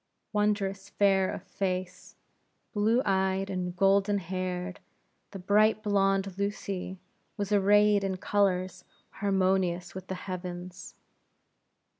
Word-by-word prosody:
Wondrous 205 -2 0
fair 195 -2 +3
of - - -6
face, 185 -1 -4 0.6
blue 220 +5 +2
eyed, 190 0 +1
and 180 -1 -3
golden 195 +2 +3
haired, 185 0 -4 0.5
the 195 - -8
bright 215 +3 +3
blonde, 195 -2 +1
Lucy, 195 -2 -3 0.4
was 205 -1 -3
arrayed 205 0 +4
in 190 -1 -1
colors 185 -2 0 0.3
harmonious 190 -3 0
with 185 0 -8
the 190 - -4
heavens. 180 -1 -7
195 Hz, 105 wpm, -29 LUFS, 185-200 Hz, 0.6 s, arrayed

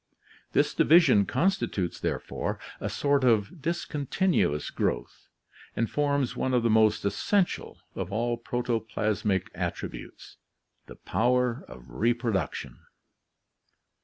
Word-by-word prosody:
This - - +2
division 160 - +5
constitutes, 165 - 0
therefore, - - -3 0.2
a - - -3
sort 140 -1 +1
of 115 - +2
discontinuous 155 - 0
growth, - - -3 0.5
and 115 - 0
forms 140 -2 0
one 130 -1 0
of 120 - +2
the 115 - +3
most 110 -2 +3
essential 180 - 0 0.2
of 95 0 -5
all 120 +3 0
protoplasmic 110 -5 -1
attributes, - - -6 0.5
the - - -11
power 125 +1 0
of 65 -1 -12
reproduction. 110 - -1
120 Hz, 105 wpm, -27 LUFS, 105-140 Hz, 0.5 s, division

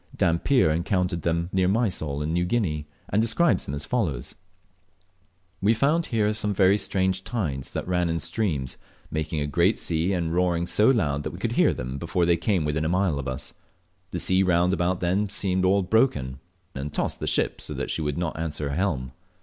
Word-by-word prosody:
Dampier 85 - +2
encountered 90 +1 0
them 85 +1 0
near 95 -1 +2
Mysol 90 -9 0
and 80 +2 -2
New 90 +1 +1
Guinea, 90 -8 -1 0.2
and 105 - +2
describes 115 - +2
them 70 - -4
as 70 - -6
follows: 80 - -2 1.3
"We 105 +4 +3
found 150 +8 +2
here 110 -3 +1
very 105 -2 +2
strange 95 -1 0
tides, 80 - -3
that - - -4
ran 90 -1 +1
in 80 0 -1
streams, 75 - -1 0.3
making 80 0 -2
a - - 0
great 85 +8 +2
sea, 85 +3 0
and 85 -3 -1
roaring 85 -1 +1
so 105 +6 +4
loud 75 - +1
that - - -4
we - - -9
could - - -2
hear - - +4
them 65 +2 -5
before 85 +1 0
they 85 0 +4
came 85 -1 0
within 75 +1 -1
a 80 - 0
mile 90 -4 +1
of 70 - -5
us. 65 +3 -5 0.6
The - - -4
sea 95 0 +3
round 90 -1 +3
about 90 0 0
them 95 +4 +1
seemed 95 -2 0
all 95 +1 +3
broken, 80 - +1 0.3
and 70 +2 -5
tossed - - -2
the - - -4
ship - - +1
so - - -5
that - - -3
she - - -1
would 75 -2 -2
not 85 -2 -3
answer 75 -3 -2
her 70 - -3
helm. 75 -9 -1
90 Hz, 200 wpm, -25 LUFS, 75-100 Hz, 1.3 s, so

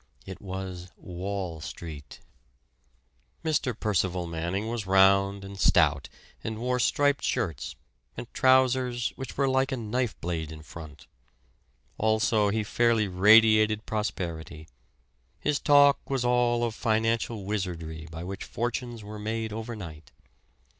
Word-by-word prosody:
It 95 -2 -9
was 95 -2 -6
Wall 90 -2 -5
Street! 75 -4 -9 1.2
Mr. 135 -7 0
Percival 95 -4 0
Manning 85 +5 -3
was 115 -4 -3
round 100 +1 +4
and 100 0 -9
stout, 70 -5 +3 0.3
and 110 -1 -4
wore 125 +2 -1
striped 145 +3 +2
shirts, 85 - -2 0.4
and - - -5
trousers 130 -2 +3
which 135 -2 -7
were 140 0 +2
like 130 +1 +1
a 130 - -1
knife 120 +1 -2
blade 80 -2 -3
in 80 -1 -10
front; 75 +1 -11 0.9
also, 110 -1 +2
he 110 +1 0
fairly 115 0 +2
radiated 110 +3 +5
prosperity. 85 -7 -4 0.7
His 145 -1 0
talk 145 -1 +5
was 135 -3 0
all 120 -1 +2
of 115 -2 -1
financial 110 -1 0
wizardry 85 -6 -4
by 80 +1 -7
which 95 +2 -6
fortunes 120 -1 -4
were 105 +1 -8
made 110 +1 -3
overnight. 105 -9 -7
105 Hz, 125 wpm, -27 LUFS, 90-120 Hz, 1.2 s, radiated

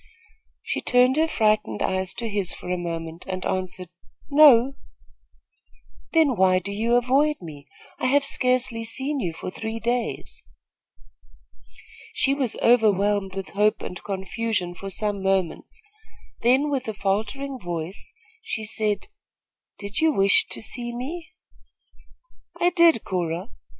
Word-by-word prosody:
She - - -2
turned 250 +1 +4
her 320 +1 +3
frightened 215 - +1
eyes 190 0 -1
to 235 - -3
his 200 -4 -2
for 180 - -7
a - - +1
moment 165 -1 -5
and 185 -1 -4
answered: 185 -1 -3 0.4
"No." 275 -3 +7 1.4
"Then 315 -6 +4
why 185 -1 +4
do 190 +2 -3
you 225 +4 +1
avoid 270 +5 +3
me? 150 -4 -10 0.3
I - - +1
have 280 +2 +3
scarcely 250 -4 0
seen 270 +5 -3
you 180 -8 -1
for 165 +3 -7
three 220 +3 -5
days." 235 +1 -3 1.7
She 275 -11 +2
was 265 -5 -1
overwhelmed 205 -4 +3
with 195 -1 -5
hope 210 +1 +1
and 180 - -7
confusion 195 -1 -2
for 195 +2 -7
some 205 0 -2
moments; 190 -3 -1 0.6
then, 265 +5 +3
with 265 -3 -2
a 220 - -3
faltering 220 +8 -2
voice, 175 - -5 0.3
she 335 - -4
asked: 215 - -1 0.7
"Did 200 +1 -5
you 320 0 +4
wish 195 -7 +3
to - - -4
see 240 0 -4
me?" 325 +8 -5 1.3
"I 350 - +3
did, 335 - +4
Cora. 175 +2 -3
215 Hz, 135 wpm, -24 LUFS, 190-255 Hz, 1.7 s, No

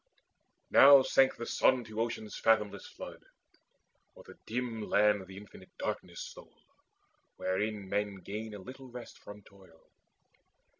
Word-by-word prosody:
Now 140 -1 +9
sank 135 0 +3
the 120 - -6
sun 130 +1 +2
to 110 0 -4
Ocean's 115 -2 -4
fathomless 110 -2 +1
flood: - - -10 0.9
O'er - - -13
the - - -14
dim 115 -1 -3
land 105 -2 +3
the 95 0 -11
infinite 100 0 -13
darkness - - -4
stole, - - -13 0.7
Wherein 100 +1 -2
men 100 +1 -1
gain 105 +3 -7
a - - -8
little 130 +6 -11
rest 120 -1 -10
from 105 0 -12
toil. 95 -5 -20
105 Hz, 135 wpm, -31 LUFS, 100-120 Hz, 0.9 s, Now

